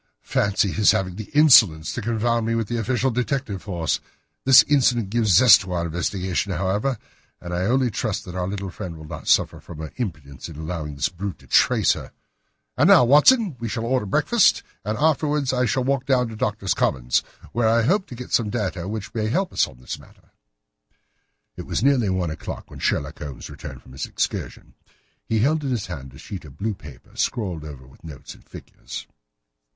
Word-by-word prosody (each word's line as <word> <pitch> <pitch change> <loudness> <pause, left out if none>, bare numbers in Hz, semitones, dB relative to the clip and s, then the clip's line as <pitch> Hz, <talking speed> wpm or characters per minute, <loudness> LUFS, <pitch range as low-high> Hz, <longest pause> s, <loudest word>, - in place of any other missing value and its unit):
"Fancy 100 -1 +1
his 105 +1 +4
having 90 -2 -2
the 110 +1 -6
insolence 110 - +6
to - - -4
confound 115 +1 0
me 115 - 0
with 115 -2 -1
the 120 +1 -2
official 125 +3 0
detective 125 -4 -2
force! 85 -6 -2 0.5
This 130 -3 +8
incident 120 -5 +2
gives 115 -2 +1
zest 115 +1 +8
to 95 -2 -6
our 85 -1 -1
investigation, 90 +3 -2
however, 100 +8 -1 0.4
and 90 0 -7
I 90 +1 -1
only 125 0 +2
trust 110 +2 -3
that 90 - -8
our 90 0 -2
little 100 -1 -4
friend 85 -1 -7
will 80 - -11
not - - -9
suffer - - +2
from 80 - -11
her 80 0 -7
imprudence 80 - -6
in 80 - -10
allowing 80 -2 -5
this 70 - 0
brute 95 +1 -6
to - - -20
trace - - +4
her. - - -9 0.6
And - - +3
now, - - +7
Watson, 160 - +5
we 115 -1 -4
shall 115 +1 -3
order 125 -3 0
breakfast, - - +3 0.2
and 105 +2 -2
afterwards 150 -3 +1
I 125 -1 +1
shall 130 +4 0
walk 135 0 -1
down 125 -3 +2
to 110 - -8
Doctors' 105 -2 -1
Commons, - - +1 0.3
where 115 -1 +1
I 115 +1 +3
hope 190 - +1
to 125 - -9
get 125 +1 -9
some 115 -3 +2
data 95 -6 -3
which 105 -1 -5
may 110 -2 -1
help 185 - -1
us - - +2
in 60 - -15
this 65 - -6
matter." - - -20 1.2
It - - -8
was 105 - -1
nearly 130 -7 +3
one 90 -3 -1
o'clock 80 - -7
when - - -10
Sherlock - - -1
Holmes 70 -3 -8
returned - - -9
from - - -16
his 65 - -5
excursion. - - -4 0.5
He 110 -1 +1
held 150 +5 +1
in 140 - -2
his 120 -6 -2
hand 70 -7 -8
a - - -12
sheet 95 +4 -8
of 70 -2 -14
blue 110 +4 -2
paper, 75 -9 -14
scrawled 90 -9 -2
over 70 -4 -10
with 65 - -20
notes 75 -4 -10
and - - -19
figures. - - -10
105 Hz, 200 wpm, -23 LUFS, 85-125 Hz, 1.2 s, This